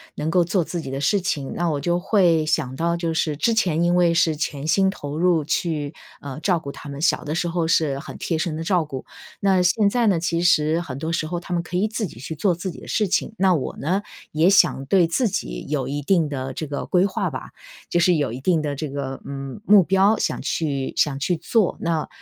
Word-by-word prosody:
能 155 +2 -2
够 180 -1 +4
做 175 +1 +1
自 170 +1 -4
己 135 - -7
的 135 +1 -4
事 195 +8 +2
情。 150 -8 -2
那 175 -1 0
我 145 - -1
就 175 +4 0
会 175 -5 +3
想 145 -4 0
到 170 +3 0
就 165 -1 -2
是 155 -2 -1
之 230 +9 +2
前 170 -7 +1
因 175 0 +2
为 175 -2 +3
是 165 -2 +3
全 150 -1 -3
心 190 +4 +3
投 145 -6 -6
入 170 -3 +3
去， 155 -1 -2 0.3
呃， 140 +1 -7
照 175 0 +1
顾 140 -3 -7
他 145 - -10
们， 140 0 -7
小 175 - +2
的 150 +2 -3
时 175 - 0
候 170 -1 -1
是 145 -4 +1
很 - - -9
贴 165 - -2
身 155 -1 -2
地 165 - -4
照 175 -1 +2
顾。 135 -4 -7 0.3
那 190 -2 +3
现 200 +4 +3
在 240 -1 +2
呢， 185 -5 +3
其 170 0 -1
实 160 -1 +3
很 135 -6 -6
多 160 +3 -3
时 155 -2 -1
候， 175 +1 -3
他 175 +1 -6
们 170 - +1
可 180 +1 -4
以 205 - +2
自 215 -1 -3
己 115 - -13
去 150 +5 -6
做 180 +2 +1
自 180 +2 -4
己 - - -11
的 - - -11
事 210 - +1
情。 215 +4 -1
那 190 0 +4
我 150 -6 -3
呢， 185 +8 0 0.3
也 160 +4 +3
想 135 -8 +4
对 185 +2 +4
自 195 +9 +1
己 - - -4
有 145 -3 -1
一 145 +1 -3
定 165 +1 +2
的 135 -2 -4
这 155 +4 -4
个 145 -1 -4
规 180 +1 +3
划 200 - -1
吧。 - - -7 0.4
就 175 - +2
是 175 +1 +4
有 145 -7 0
一 125 - -6
定 170 +2 +2
的 145 -2 -3
这 150 +1 -4
个， 135 -1 -5
嗯， 135 +5 -7
目 205 -2 +7
标 195 +5 +3
想 - - -1
去 140 -5 -2
想 140 -2 +1
去 175 +4 0
做， 190 +4 +1
那， 165 -2 -1
165 Hz, 265 characters per minute, -22 LUFS, 145-180 Hz, 0.4 s, 目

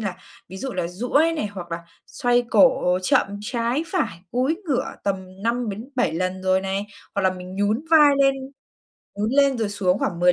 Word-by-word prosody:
là 195 -4 -3 0.3
ví 190 - -9
dụ 265 +6 -4
là 180 -2 -2
duỗi 250 - +1
này, 210 - -1
hoặc 180 -4 -8
là 170 - -2 0.3
xoay 245 0 +1
cổ 180 -9 +4
chậm 185 - +3
trái 235 +7 -1
phải, 310 - -2
cúi 260 +6 +1
ngửa 280 -7 0 0.2
tầm 190 -1 -4
5-7 235 - -1
lần 185 +2 -2
rồi 185 0 +2
này. 195 +2 -2 0.3
Hoặc 200 - 0
là 190 - +4
mình 185 +1 -9
nhún 210 +8 0
vai 300 -3 +7
lên 275 0 +4 0.8
nhún 210 +3 -1
lên 275 -2 +3
rồi 220 -2 0
xuống 195 -2 0
khoảng 175 -4 -2
10 180 0 +6
205 Hz, 185 wpm, -23 LUFS, 185-255 Hz, 0.8 s, vai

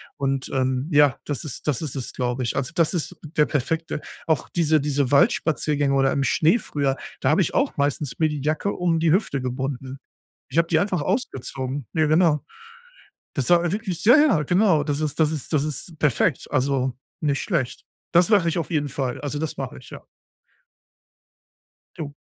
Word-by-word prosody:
Und, 135 -1 -2
ähm, 130 +1 0
ja, 145 -3 +5
das 145 -6 -3
ist 150 -1 -7
das 145 -3 0
ist 150 -4 -4
es, 130 - -5
glaube 125 0 -2
ich. 120 - -2
Also, 135 +4 -2
das 170 0 +2
ist 175 +1 -3
der 150 -1 +1
perfekte 155 +3 -2 0.3
auch 160 -3 0
diese 160 -2 +2
diese 140 -2 0
Waldspaziergänge 145 0 +2
oder 135 -1 +3
im 140 - 0
Schnee 165 - +3
früher, 140 -6 -1 0.2
da - - +1
habe - - +4
ich - - -1
auch - - +1
meistens 140 -1 -1
mir 155 - +3
die 150 -2 -4
Jacke 155 +7 0
um 170 -2 0
die 165 -1 +3
Hüfte 165 -7 +1
gebunden. 130 +1 -4 0.5
Ich 140 - -5
habe 165 - +4
die 160 - +3
einfach 185 -4 0
ausgezogen. 135 - -3
Ne, 155 -1 +2
genau. 155 -1 +3 0.9
Das 135 0 -1
war 175 -1 +4
wirklich 200 -5 -3
sehr 235 +4 +7
ja, 305 +1 +6
ja 150 - -1
genau. 175 -2 +3
Das 145 -1 -2
ist 155 0 -2
das 155 -1 +3
ist 155 0 -5
das 145 -2 +3
ist 155 +2 -6
perfekt, 145 +1 +1
also, 130 -2 +1 0.3
nicht 145 -2 0
schlecht. 145 -10 -2 0.3
Das 175 +2 +4
mache 200 -6 +4
ich 165 - -2
auf 170 - -3
jeden 145 -2 0
Fall. 130 -1 -3
Also 145 0 -3
das 155 0 -3
mache - - -5
ich, - - -13
ja. - - -10 1.9
Ja. 150 - -5
150 Hz, 190 wpm, -23 LUFS, 135-165 Hz, 1.9 s, sehr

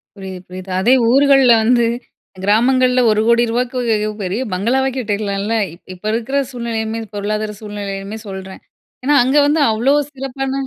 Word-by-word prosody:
புரியுது, 190 -2 -8
புரியுது. 185 +1 -9
அதே 230 +7 +4 0.2
ஊர்கள்ல 270 -2 +5
வந்து, 240 +1 +3 0.6
கிராமங்கள்ல 250 +5 +3
ரூ.10,000,000 235 0 +1
பெரிய 190 +6 -2
பங்களாவே 250 +8 +1
கட்டிற்லாம்ல? 205 -2 -2 0.4
இப்ப 180 - -16
இருக்கிற 240 +5 -2
சூழ்நிலையுமே, 225 -2 -3
பொருளாதார 210 +1 -3
சூழ்நிலையுமே 205 0 -6
சொல்றேன். 190 -1 -8 0.4
ஏன்னா, 290 +3 +3
அங்க 265 +4 +2
வந்து 300 +1 +2
அவ்ளோ 235 +6 +2 0.2
சிறப்பான 270 0 -4
225 Hz, 120 wpm, -17 LUFS, 205-255 Hz, 0.6 s, ஊர்கள்ல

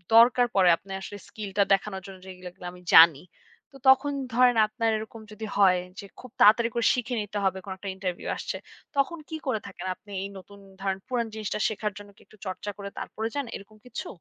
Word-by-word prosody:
দরকার 245 +1 +7
পড়ে 185 -2 +6
আপনে 195 - -14
আসলে 205 +1 -7
স্কিলটা 205 -1 -1
দেখানোর 195 -1 -1
জন্য 190 -1 -10
যেগুলো 185 -1 -10
এগুলো 180 - -13
আমি 180 0 -14
জানি। 160 -3 +9 0.5
তো - - -11
তখন 265 +2 +5 0.2
ধরেন 245 -1 +5
আপনার 230 0 -1
এরকম 220 +1 -8
যদি 220 +1 -7
হয় 185 -3 +5 0.2
যে 200 - -7
খুব 250 -2 -12
তাড়াতাড়ি 230 +2 +6
করে 235 -1 0
শিখে 245 0 -2
নিতে 205 0 -5
হবে 190 0 +1
কোনো 190 - -5
একটা 195 +1 -6
ইন্টারভিউ 185 -2 -4
আসছে। - - -4 0.4
তখন 280 +5 +1
কি 320 - -4
করে 235 -5 +1
থাকেন 190 - -9
আপনি 205 - -17
এই - - -3
নতুন 200 +2 -13 0.2
ধরেন 195 -1 -1
পুরান 240 -2 -1
জিনিসটা 215 -1 -3
শেখার 215 -1 -2
জন্য 205 0 -11
কি - - -22
একটু 215 - -20
চর্চা 190 +2 -4
করে 200 -1 -6
তারপরে 220 +1 -4
যান 285 -2 -1
এরকম 215 +2 -11
কিছু? 245 - -6
210 Hz, 205 wpm, -27 LUFS, 190-230 Hz, 0.5 s, জানি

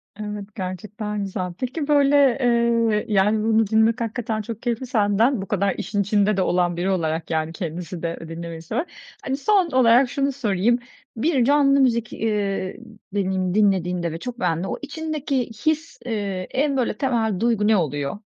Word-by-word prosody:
Evet, 210 -1 -7
gerçekten 205 +2 -4
güzel. 185 -2 -4
Peki, 280 +4 -3
böyle, 285 -1 +4 0.2
eee, 235 -3 +2
yani, 210 +1 +2
bunu 225 -1 +3
dinlemek 220 +3 +3
hakikaten 225 -1 -2
çok 225 +1 -7
keyifli 240 +1 -2
senden, 220 +1 +2
bu 195 - -6
kadar 200 -1 0
işin 205 0 -2
içinde 205 0 +2
de - - +2
olan 175 -1 +1
biri 180 +2 0
olarak, 165 -3 -1
yani, 160 0 -1
kendisi 175 -1 -6
de 170 0 -3
dinlemeyi 165 0 -7
seven. 240 - -2 0.4
Hani, 270 +1 -2
son 375 +2 +2
olarak 250 0 +5
şunu 275 +1 0
sorayım, 235 -2 +1 0.4
bir 260 -1 +2
canlı 280 0 +4
müzik, 235 -4 +1
eee, 200 -4 -2 0.4
deneyimi 190 -2 0
dinlediğinde 180 -5 +1
ve 165 - -6
çok 245 +2 -6
beğendiğinde, 175 0 0
o - - -3
içindeki 290 -4 -3 0.2
his, 315 -4 0
eee, 200 -5 -3
en 280 +1 +1
böyle 250 - 0
temel 225 -8 0
duygu 225 -2 +2
ne 220 -1 +5
oluyor? 145 -1 -2
215 Hz, 165 wpm, -23 LUFS, 185-250 Hz, 0.4 s, olarak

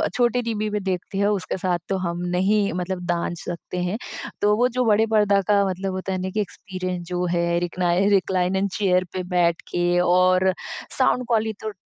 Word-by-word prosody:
छोटे 245 0 +2
टीवी 215 -2 -2
पे 210 0 -1
देखते 190 0 -3
हो, 205 +1 +3
उसके 190 - -3
साथ 180 -1 0
तो 195 - +1
हम 170 0 -3 0.2
नहीं 200 +2 +2
मतलब 180 0 -3
दांज 175 -1 -1
सकते 175 +1 -6
हैं, 180 +4 -1 0.4
तो 210 0 +4
वो 245 +2 +4
जो 250 0 -1
बड़े 220 0 +4
पर्दा 205 -2 +4
का 205 -1 +4
मतलब 190 +1 -3
होता 190 +1 -4
है 185 - -1
ना 185 - -2
कि 215 +3 -1
एक्सपीरियंस 185 -3 -5
जो 180 0 -1
है, 170 -1 0
रिक्नाइ 175 +2 +1
रिक्लाइनर 190 0 +1
चेयर 185 -3 +2
पे 185 -1 -3
बैठ 170 -1 +2
के 175 0 +1
और 185 +1 +4 0.4
साउंड 250 - +3
क्वाली 220 -2 +1
तो 215 - -4
190 Hz, 190 wpm, -23 LUFS, 180-210 Hz, 0.4 s, तो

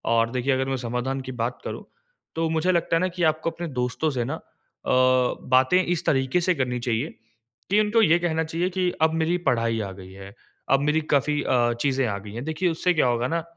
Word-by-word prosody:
और 115 0 +2
देखिए, 130 +2 0
अगर 130 0 0
मैं 135 - -1
समाधान 125 +2 -3
की 130 - -7
बात 120 +2 -2
करूँ, - - -5 0.5
तो 165 0 0
मुझे 160 +3 +1
लगता 170 -1 +1
है - - +3
ना 185 - +2
कि 180 -1 -4
आपको 155 +1 +1
अपने 170 +1 -6
दोस्तों 125 +6 0
से 125 -3 -1
ना 140 - -3
अ, - - -9 0.5
बातें 130 +4 +3
इस 175 -3 -2
तरीके 135 +5 +1
से 180 +1 +1
करनी 125 -3 -1
चाहिए 120 +3 -1 0.6
कि, 205 +2 +4
उनको 215 +2 +3
ये 170 -4 +4
कहना 160 -2 0
चाहिए 165 +3 -2
कि 180 -1 0
अब 160 0 +3
मेरी 165 +2 +1
पढ़ाई 115 -1 0
आ 100 -2 -4
गई 95 -1 -11
है। 95 +1 -11 0.4
अब 135 - +5
मेरी 150 +2 +1
काफ़ी 145 +2 +1
अ, 120 -2 +2
चीज़ें 135 -1 +1
आ 100 -2 -2
गई 100 0 -10
है। 115 - -5
देखिए, 160 +5 -1
उससे 175 +2 +1
क्या 155 -6 +2
होगा 120 0 0
ना 165 +3 -1
135 Hz, 225 wpm, -24 LUFS, 125-165 Hz, 0.6 s, अब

